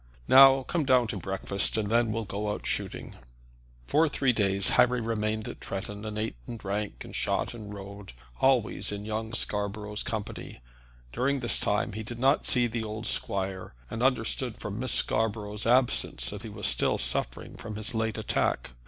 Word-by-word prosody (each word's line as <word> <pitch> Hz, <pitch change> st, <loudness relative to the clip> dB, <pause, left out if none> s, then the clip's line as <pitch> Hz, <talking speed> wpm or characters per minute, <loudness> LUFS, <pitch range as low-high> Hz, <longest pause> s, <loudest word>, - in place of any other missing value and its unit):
Now 135 Hz, 0 st, +8 dB
come 165 Hz, +4 st, -1 dB
down 130 Hz, -3 st, +4 dB
to 105 Hz, -, -3 dB
breakfast, 95 Hz, +2 st, 0 dB
and 105 Hz, -1 st, -1 dB
then 115 Hz, -1 st, +3 dB
we'll 115 Hz, 0 st, -2 dB
go 105 Hz, +1 st, -3 dB
out 105 Hz, -, -4 dB
shooting." -, -, -4 dB, 0.7 s
For 155 Hz, -, +3 dB
three 135 Hz, -2 st, +1 dB
days 100 Hz, -3 st, +3 dB
Harry 125 Hz, 0 st, +4 dB
remained 110 Hz, -1 st, -2 dB
at -, -, -7 dB
Tretton, 100 Hz, +2 st, -5 dB
and 105 Hz, 0 st, -5 dB
ate 110 Hz, -, -3 dB
and 120 Hz, -, -6 dB
drank, 105 Hz, 0 st, -4 dB
and -, -, -10 dB
shot -, -, 0 dB
and 105 Hz, -3 st, -9 dB
rode, 100 Hz, -3 st, -9 dB, 0.3 s
always 130 Hz, -7 st, +2 dB
in 105 Hz, 0 st, -5 dB
young 110 Hz, +1 st, -3 dB
Scarborough's 105 Hz, -1 st, -2 dB
company. 110 Hz, -, -5 dB, 0.5 s
During 140 Hz, +2 st, +1 dB
this 120 Hz, -, +3 dB
time 105 Hz, 0 st, 0 dB
he 110 Hz, -, -4 dB
did 115 Hz, +2 st, -7 dB
not 135 Hz, +4 st, +2 dB
see 125 Hz, -2 st, +4 dB
the 115 Hz, -1 st, -2 dB
old 110 Hz, +1 st, -5 dB
squire, 95 Hz, -, -2 dB, 0.2 s
and 115 Hz, -, -4 dB
understood 125 Hz, -1 st, +1 dB
from 105 Hz, +1 st, -5 dB
Miss 130 Hz, -1 st, -1 dB
Scarborough's 105 Hz, -1 st, 0 dB
absence 125 Hz, +1 st, +2 dB
that -, -, -6 dB
he -, -, -7 dB
was -, -, -5 dB
still -, -, +2 dB
suffering -, -, -1 dB
from 110 Hz, -2 st, -7 dB
his 110 Hz, +4 st, -1 dB
late 110 Hz, 0 st, -1 dB
attack. 105 Hz, -, 0 dB
110 Hz, 180 wpm, -28 LUFS, 105-120 Hz, 0.7 s, Now